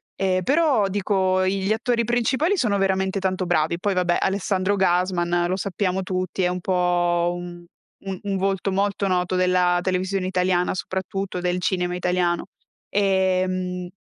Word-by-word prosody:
E 185 -1 0
però 280 - +3
dico, 190 -1 +1
i 190 +1 0
gli 210 - +1
attori 235 +1 0
principali 260 - +1
sono 210 -8 +1
veramente 190 0 0
tanto 185 -1 -1
bravi. 170 0 +1
Poi 200 0 0
vabbè, 180 -1 +1
Alessandro 190 0 0
Gasman, 175 -2 +1
lo 185 - 0
sappiamo 190 -1 -1
tutti, 185 0 -3
è - - +3
un 180 0 -3
po' 175 -1 +1
un 175 0 -8 0.4
un 190 -1 -4
un 200 -1 -1
volto 195 0 -1
molto 200 +1 0
noto 180 0 0
della 180 -1 +3
televisione 185 +1 -1
italiana, 180 -1 +1
soprattutto 190 0 -4
del 180 0 -1
cinema 180 -1 0
italiano. 180 -1 0 0.4
Ehm, 185 -2 0
185 Hz, 150 wpm, -23 LUFS, 180-195 Hz, 0.4 s, però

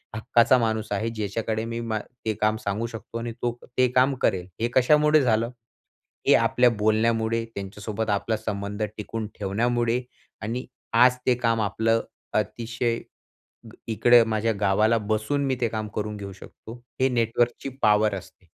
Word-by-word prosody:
हक्काचा 120 +3 +4
माणूस 110 -2 -1
आहे 105 +3 -1
ज्याच्याकडे 110 0 -3
मी 115 0 -4
मा 110 -2 -2 0.3
ते 110 - +1
काम 110 0 +2
सांगू 100 +3 -1
शकतो 115 0 -8
आणि 115 0 -4
तो 120 - +1 0.3
ते 130 0 +5
काम 130 +2 +4
करेल. 90 -1 +1
हे 115 - +2
कशामुळे 150 +4 +5
झालं? 115 -2 +2 0.8
हे - - +7
आपल्या 125 0 +4
बोलण्यामुळे, 110 +1 +1
त्यांच्यासोबत 105 +2 -4
आपला 105 +2 0
संबंध 105 -1 -4
टिकून 110 +1 -4
ठेवण्यामुळे 120 +4 0 0.4
आणि 120 +4 -3 0.4
आज 125 0 +5
ते 125 - +5
काम 115 -2 +1
आपलं 115 +2 +1 0.4
अतिशय 115 +2 -2 0.7
ग - - -15
इकडे 120 +2 +5
माझ्या 110 0 0
गावाला 105 +3 +3
बसून 110 +6 -1
मी 130 -1 0
ते 120 - +2
काम 110 -1 -4
करून 105 0 -3
घेऊ 100 -1 -7
शकतो. 115 +4 -12 0.2
हे 130 - +4
नेटवर्कची 120 +1 0
पॉवर 105 0 +4
असते. - - -10
115 Hz, 150 wpm, -25 LUFS, 105-120 Hz, 0.8 s, हे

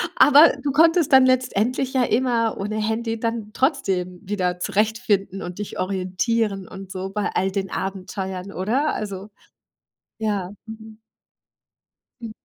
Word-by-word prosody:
Aber 295 +3 +7
du 285 - 0
konntest 330 +1 +4
dann 265 -1 +8
letztendlich 255 0 +1
ja 260 - +3
immer 235 -1 +1
ohne 210 +2 -3
Handy 225 +1 -2
dann 230 -2 -3
trotzdem 190 - -1
wieder 180 -3 -2
zurechtfinden 205 -2 0
und 180 +3 -7
dich 210 - -6
orientieren 195 +2 -1
und 190 -1 -10
so 190 0 -5
bei 210 +1 -2
all 190 +1 +1
den 195 -1 -3
Abenteuern, 190 0 -5
oder? 240 +11 0
Also 200 -1 -5 0.9
ja, 205 -4 -2 0.2
mhm. 220 0 -11 1.2
Hm. 230 -2 -6
210 Hz, 130 wpm, -22 LUFS, 190-235 Hz, 1.2 s, dann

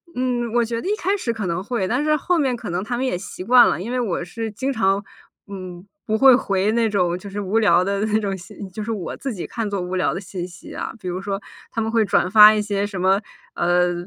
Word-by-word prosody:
嗯， 245 -2 -1
我 240 0 +3
觉 230 0 -3
得 - - -5
一 415 - +1
开 390 0 0
始 245 -11 -2
可 220 -3 -4
能 170 +2 -2
会， 210 -3 -2
但 245 +8 0
是 305 0 +3
后 350 +4 0
面 270 -5 +1
可 235 - -7
能 175 +2 -2
他 240 +3 -3
们 260 - -1
也 255 - -1
习 180 0 -8
惯 240 +3 +7
了。 160 - -1
因 230 - -5
为 250 - 0
我 200 -8 -1
是 225 +5 -5
经 260 +6 -2
常， 200 -5 +1 0.4
嗯， 185 -2 -8 0.2
不 220 - 0
会 265 +1 +7
回 200 -4 0
那 230 -1 +2
种 180 -4 +1
就 200 +2 -9
是 200 +1 -5
无 205 +2 0
聊 200 -5 +4
的 200 +2 -1
那 215 0 +1
种 200 -2 -2
信 175 -1 -13
就 210 +3 -6
是 230 - -3
我 200 -6 -4
自 270 -3 -4
己 180 - -6
看 225 -3 -3
作 200 -1 -2
无 180 +1 -4
聊 185 - +1
的 175 - -3
信 185 -2 -6
息 170 -2 -12
啊。 - - -5
比 185 - -8
如 180 +1 -3
说 195 0 -3 0.3
他 - - -3
们 220 - -2
会 225 -1 +3
转 180 -1 +2
发 210 +1 +9
一 215 - +1
些 205 -1 -1
什 200 -2 -5
么， 190 +2 +3 0.3
呃， 175 0 +2
205 Hz, 290 characters per minute, -22 LUFS, 185-235 Hz, 0.4 s, 发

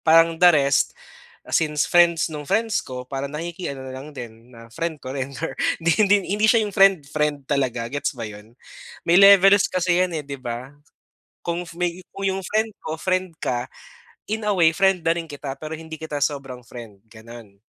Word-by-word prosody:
parang 165 +1 +4
the 180 - +8
rest 140 -4 +2 0.5
since 150 -2 +1
friends 170 -2 +4
nung 150 -2 -7
friends 220 +8 0
ko 125 -1 -8
parang 140 0 -4
nakiki-ano 165 -3 -5
na - - -7
lang 140 +3 -9
din 120 -2 -11
na 115 0 -13
friend 160 +5 -4
ko 130 +1 -7
rin 135 0 -4
or 165 - -3 0.3
hindi 165 +1 +2
hindi 205 -1 +5 0.2
hindi 210 - 0
siya 230 0 +5
yung 205 -2 -6
friend 195 -7 +5
friend 150 -2 -1
talaga 125 -4 -1
gets 145 +3 -2
ba 115 -4 -6
yun? 105 +2 -13 0.6
May 170 - +6
levels 195 0 +7
kasi 180 -1 +1
yan, 185 -1 +1
eh, - - -2
'di 140 0 -5
ba? 120 +1 -5 0.8
Kung 170 +1 -2
may 175 0 -2
kung 195 - -4
yung 190 0 0
friend 220 +2 0
ko, 155 - -5
friend 185 +2 -1
ka 120 0 -2 0.6
in 220 -1 -2
a 210 - +2
way 170 -4 +5
friend 190 -3 +3
na 165 - +1
rin 170 -1 -4
kita 140 -3 -7
pero 155 +1 -6
hindi 160 0 -8
kita 150 -2 -5
sobrang 135 -4 -2
friend, 115 -5 -11
gano'n. 110 -2 -13
155 Hz, 195 wpm, -22 LUFS, 130-180 Hz, 0.8 s, the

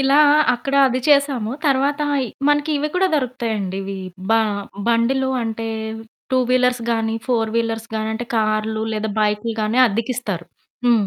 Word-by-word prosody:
ఇలా 270 +1 +3 0.4
అక్కడ 275 +3 -4
అది 255 0 0
చేసాము. 280 -6 +3 0.2
తర్వాత 280 +1 +2 0.2
ఈ - - -4 0.2
మనకి 295 +1 +2
ఇవి 300 - -1
కూడా 375 +1 +3
దొరుకుతాయండి 230 -8 -2
ఇవి, 195 0 -5 0.3
బ - - +5 0.6
బండిలు 255 +3 +2
అంటే 225 0 -3 0.7
టూ 260 - +4
వీలర్స్ 250 -1 +2
గానీ 225 0 -1
ఫోర్ 225 -3 +1
వీలర్స్ 230 0 -1
గానీ 220 0 -1
అంటే 240 +2 -4
కార్లు 215 0 0
లేదా 215 0 -2
బైక్లు 210 +2 0
కానీ 215 +4 0
అద్దెకిస్తారు. 225 -4 -3 0.4
హ్మ్, 225 -4 +4
230 Hz, 145 wpm, -20 LUFS, 220-260 Hz, 0.7 s, బ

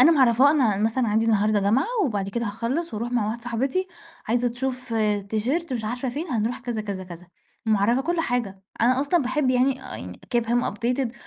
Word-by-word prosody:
أنا 275 +6 +8
معرّفاه، 260 -1 +5
أنا 255 -9 +3
مثلًا 225 +4 +1
عَندي 220 +2 +2
النهارده 210 -1 +3
جامعة، 210 - +2 0.2
وبعد 200 - -1
كده 235 +3 -2
هاخلّص 235 +10 -2
وأروّح 235 +3 -3
مع 235 -4 +1
واحدة 230 +2 -4
صاحبتي، 260 +10 -1 0.4
عايزة 245 +1 +2
تشوف 250 0 -4 0.3
تيشيرت 265 +9 -1
مش 235 -3 -2
عارفة 245 +4 -2
فين، 290 +8 -4
هنروح 235 +2 -1
كذا، 240 -3 -3
كذا، 200 -3 -5
كذا، 180 0 -11 0.4
معرّفاه 220 +3 +3
كل 340 +4 0
حاجة، 235 -9 -2 0.2
أنا 250 +3 +4
أصلًا 295 +4 +2
باحب 260 +1 +1
يعني، 260 +1 +2
آآ 90 - -7 0.2
give - - +5
him 240 +2 +1
updated، 240 +3 -1
240 Hz, 185 wpm, -24 LUFS, 215-260 Hz, 0.4 s, أنا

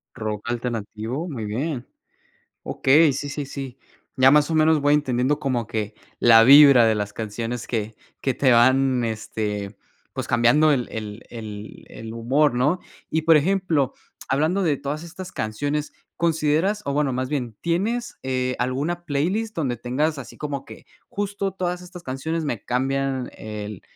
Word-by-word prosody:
¿Rock 105 0 -4
alternativo? 120 - -3
Muy 125 -10 -5
bien. 125 +5 -3 0.8
Okey, 150 +3 +4
sí, 145 +2 -4
sí, 145 0 -4
sí. 135 -2 -7 0.4
Ya, 130 0 +6
más 150 +2 +4
o - - 0
menos, 155 0 +4
voy 145 +1 +3
entendiendo 135 0 +1
como 130 -6 -1
que 105 -1 -3 0.2
la 115 -1 +7
vibra 140 -2 +9
de 110 -1 +3
las 105 -1 -3
canciones 115 +2 -4
que 110 -2 -3 0.2
que 135 - 0
te 130 0 +3
van, 130 +1 +4
este, 105 -2 -4 0.4
pues, - - -4
cambiando 120 +6 +4
el 125 -4 -1
el 110 +1 -6
el 110 -2 -8
el 110 0 -9
humor, 130 +5 +2
¿no? 145 +9 +1 0.3
Y, 160 - 0
por 160 0 +6
ejemplo, 160 -4 +1 0.3
hablando 155 +9 +1
de 155 -5 +2
todas 145 +3 -4
estas 180 +2 -9
canciones, 145 +8 -2 0.2
¿consideras 165 +5 +1
o, 140 - -2
bueno, 145 -1 +1
más 130 +1 -2
bien, 125 -7 -3
tienes, 220 +8 -1
eh, 130 -1 -1
alguna 145 +8 -2
playlist 190 +10 -1
donde 130 -7 -1
tengas 145 +6 -1
así 135 - -9
como 140 -2 -4
que - - -12 0.2
justo 200 -1 -3
todas 180 -1 -3
estas 180 -1 -11
canciones 160 +4 -3
me 120 -8 -3
cambian 135 +1 -1
el 105 -2 -7
135 Hz, 160 wpm, -23 LUFS, 120-155 Hz, 0.8 s, vibra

